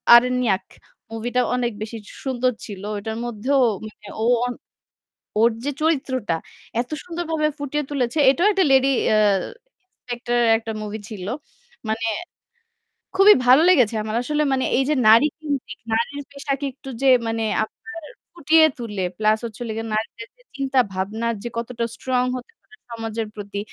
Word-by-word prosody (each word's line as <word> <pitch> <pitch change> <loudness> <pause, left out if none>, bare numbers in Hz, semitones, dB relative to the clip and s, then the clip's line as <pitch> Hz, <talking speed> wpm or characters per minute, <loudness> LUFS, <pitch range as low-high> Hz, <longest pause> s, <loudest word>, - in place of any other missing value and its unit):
আরন্যাক 245 -5 +3 0.5
মুভিটা 240 +3 -1
অনেক 245 -1 0
বেশি 220 +1 -5
সু - - -12
সুন্দর 255 -1 +1
ছিল। 200 -3 -8 0.2
ওটার 220 +2 -4
মধ্যেও 240 +4 +1 0.3
মানে 215 -1 -14
ও - - 0 0.2
অন 245 - -2 0.9
ওর 230 +2 +5
যে 290 - 0
চরিত্রটা, 260 - 0 0.5
এত 245 - -8
সুন্দরভাবে 330 -3 -1
ফুটিয়ে 290 +1 -2
তুলেছে। 265 +1 -1
এটাও 340 +9 +3
একটা 385 -2 +3
লেডি 270 0 +5 0.2
অ্যাঁ 210 -2 +4 0.6
ইন্সপেক্টরের 240 -1 -1
একটা 225 0 -6
মুভি 210 +1 -5
ছিল। 200 -5 -7 0.6
মানে 225 +1 -1 1.1
খুবই 395 +2 +8
ভালো 260 +5 +7
লেগেছে 250 - +5
আমার 215 +1 -3
আসলে 300 +4 0
মানে 260 -1 +1
এইযে 270 +3 +2
নারী 230 +6 +7
কেন্দ্রিক 290 -4 -4
নারীর 235 +6 -1
পেশাকে 280 0 -3
একটু 270 +1 -13
যে 270 - +4 0.2
মানে 225 0 -1 0.2
আপনার 255 +8 -11 0.3
ফুটিয়ে 320 -1 +4
তুলে 210 -6 -3
প্লাস 215 0 +3
হচ্ছে 225 -1 -7
হলো 240 - -4
লেগে 225 +1 -3
নারীদের 225 +1 -4
যে - - -25
চিন্তা 270 -1 0
ভাবনা 205 +5 -3 0.2
যে 240 - -3
কতটা 235 0 -3
strong 255 -1 0
হতে 255 - -9
পারে 435 - -21
সমাজের 225 -1 -4
প্রতি, 205 -1 -6
245 Hz, 150 wpm, -22 LUFS, 220-275 Hz, 1.1 s, খুবই